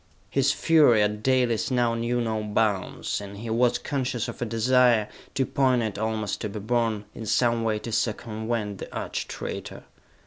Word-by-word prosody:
His 135 0 +3
fury 145 -11 +5
at 105 0 -1
Dalis 125 -3 +2
now 120 -2 +2
knew 115 +1 -1
no 110 -2 -1
bounds, 105 -2 -1
and 100 0 -8
he 115 +2 -5
was 120 +1 +3
conscious 130 -5 -2
of - - -8
a - - +1
desire, 115 -1 +3 0.3
too 135 -1 +2
poignant 125 -7 +1
almost 110 -2 -2
to 105 - -2
be 105 +1 -6
borne, 110 -1 0
in 110 - -7
some 115 +2 +2
way 110 -1 +1
to 115 +2 -6
circumvent 110 -2 -2
the - - -8
arch - - -4
traitor. - - -6
115 Hz, 170 wpm, -26 LUFS, 105-125 Hz, 0.3 s, fury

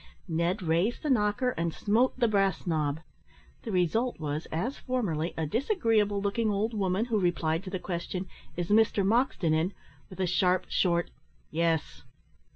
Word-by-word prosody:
Ned 170 +3 0
raised 175 +8 +1
the 300 - +1
knocker, 215 +2 +2
and 165 -6 -2
smote 230 +6 +2
the 240 -2 +3
brass 195 -4 +1
knob. 155 -3 0 0.6
The 225 - -5
result 200 +7 +1
was, 150 0 -3
as 230 - -2
formerly, 185 - -2
a 160 - 0
disagreeable 225 - +1
looking 205 +3 0
old 210 +3 0
woman, 195 0 0
who 230 -3 0
replied 170 -2 0
to - - -5
the 185 - -2
question, 180 +1 -4 0.3
"Is 175 -1 -2
Mr 210 -2 +4
Moxton 215 -7 +2
in?" 165 +5 +1 0.4
with 185 - -12
a 190 - +2
sharp, 180 +1 +2
short, 170 -2 +1 0.4
"Yes." 165 0 0
190 Hz, 160 wpm, -29 LUFS, 170-220 Hz, 0.6 s, Mr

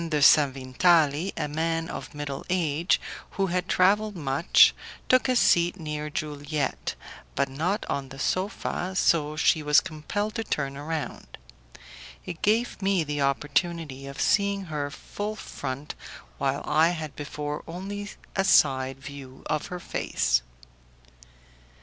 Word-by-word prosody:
de 150 -2 +1
Sanvitali, 145 +4 +4
a - - -1
man 165 +2 -1
of - - -7
middle 145 -2 -4
age, 170 -2 +2 0.4
who 195 - +2
had 180 0 -1
travelled 205 +3 +3
much, 145 0 +5 0.3
took 255 +1 +4
a 255 - +3
seat 175 -5 +4
near 150 -1 -4
Juliette, 150 -1 -3 0.4
but 140 - +2
not 165 +10 -1
on 135 -1 -3
the 135 - -10
sofa, 185 +2 -2
so 155 -4 +2
she 160 +1 +3
was 150 0 +5
compelled 190 +6 -3
to 225 -1 -2
turn 140 -9 -2
round. 150 -1 -5 0.9
It 160 - -7
gave 220 +1 +1
me 195 -3 +2
the 145 -1 -3
opportunity 145 0 -1
of 140 - -8
seeing 200 -1 +2
her 150 -3 -3
full 205 +7 -5
front, 140 -7 -6 0.5
while - - 0
I 160 +2 +4
had 160 -5 -4
before 150 0 -4
only 200 +4 -5 0.3
a 195 - +2
side 135 -7 +4
view 135 -1 -10
of 150 -1 -1
her 180 - -5
face. - - 0
155 Hz, 135 wpm, -26 LUFS, 145-185 Hz, 0.9 s, much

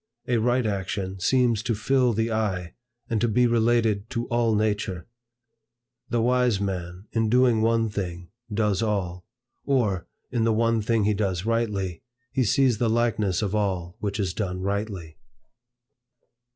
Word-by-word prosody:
A 125 -2 +2
right 120 +2 +2
action 95 -2 -3
seems 120 +2 +2
to 115 0 -1
fill 125 +3 +2
the 110 +2 0
eye, 95 -6 -1 0.3
and 115 -2 -1
to 120 - +3
be 125 +3 +3
related 115 -2 +2
to 120 -2 -2
all 120 -2 +2
nature. 105 -4 -1 1.0
"The 120 -2 +1
wise 125 -3 +2
man, 90 -1 -4
in 115 -1 +1
doing 125 -2 +4
one 115 0 +2
thing, 90 -4 -5 0.2
does 105 -2 +1
all; 95 -3 -2 0.4
or, 110 -10 0 0.2
in 120 -2 0
the 115 0 +3
one 115 0 +2
thing 110 0 +1
he 105 +1 +2
does 95 -3 -1
rightly, 105 -7 -1 0.3
he 130 - +1
sees 125 +1 +2
the 120 - +2
likeness 110 -4 +1
of 100 -1 -2
all 95 -4 -1
which 100 -1 -3
is 95 -4 -1
done 90 -3 -3
rightly." 100 -5 -3
110 Hz, 150 wpm, -25 LUFS, 95-115 Hz, 1.0 s, doing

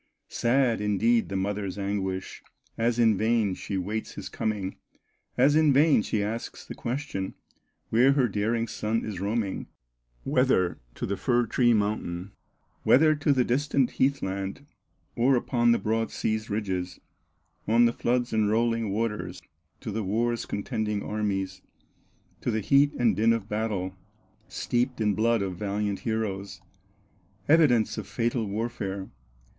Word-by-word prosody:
Sad, 120 -2 +2
indeed, 110 +3 +2
the 100 - -4
mother's 100 0 -2
anguish, 95 -1 -3 0.3
As 115 +1 0
in 110 -4 +4
vain 110 -3 +2
she 95 +1 -4
waits 105 +4 -3
his - - -7
coming, 100 -3 -3 0.6
As 140 +4 +5
in 155 -2 +5
vain 145 -2 +5
she 105 -1 -1
asks 110 +3 -5
the - - -7
question, 120 -6 -4 0.6
Where 125 +5 +5
her 135 -3 +3
daring 115 +2 -1
son 110 +1 -2
is 105 -4 -5
roaming, 100 0 -2 0.6
Whether 90 -1 +2 0.2
to - - -3
the 100 - -2
fir 120 -1 +2
tree 120 +1 +3
mountain, 100 -3 -2 0.5
Whether 155 +3 +5
to 145 0 +2
the 130 -2 +3
distant 135 +1 +1
heath 135 +1 +1
land, 95 +7 -4 0.5
Or 130 +3 +4
upon 120 -1 +2
the 115 - +4
broad 110 +2 -1
sea's 110 0 -2
ridges, 95 -4 -3 0.7
On 115 +2 +5
the 115 - +2
floods 120 0 0
and 110 -2 +2
rolling 115 0 +1
waters, 110 +1 -2 0.4
To - - -5
the 110 +1 -2
war's 115 +4 -1
contending 105 -1 -2
armies, 100 -3 -2 0.8
To - - -1
the 110 - 0
heat 140 +6 +4
and 115 -5 +2
din 110 +3 +4
of 110 -3 -3
battle, 105 -4 -2 0.5
Steeped 120 +1 -1
in 105 -2 +2
blood 115 +1 +2
of 95 -2 -4
valiant 100 0 -2
heroes, 100 -4 -3 0.9
Evidence 140 -9 +4
of 100 - -7
fatal 115 +1 -1
warfare. 100 -2 -3
110 Hz, 145 wpm, -27 LUFS, 100-120 Hz, 0.9 s, As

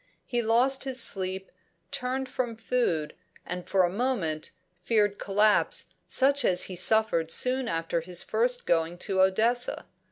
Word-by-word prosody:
He 240 -1 -1
lost 245 +4 +2
his 265 -1 0
sleep, 190 -3 0 0.4
turned 260 +1 -3
from 255 -3 -3
food, 220 -9 -1 0.3
and 180 0 -6
for 190 -1 +3
a 175 - +2
moment 195 -9 -2 0.3
feared 205 0 +1
collapse 210 +1 +1
such 280 +1 +2
as 180 -4 +3
he 190 - -5
had 175 - -1
suffered 180 -6 +2
soon 255 +7 +1
after 165 0 -2
his 175 +1 -2
first - - 0
going 165 +1 0
to 190 +1 -1
Odessa. 225 +6 +1
215 Hz, 150 wpm, -27 LUFS, 180-250 Hz, 0.4 s, for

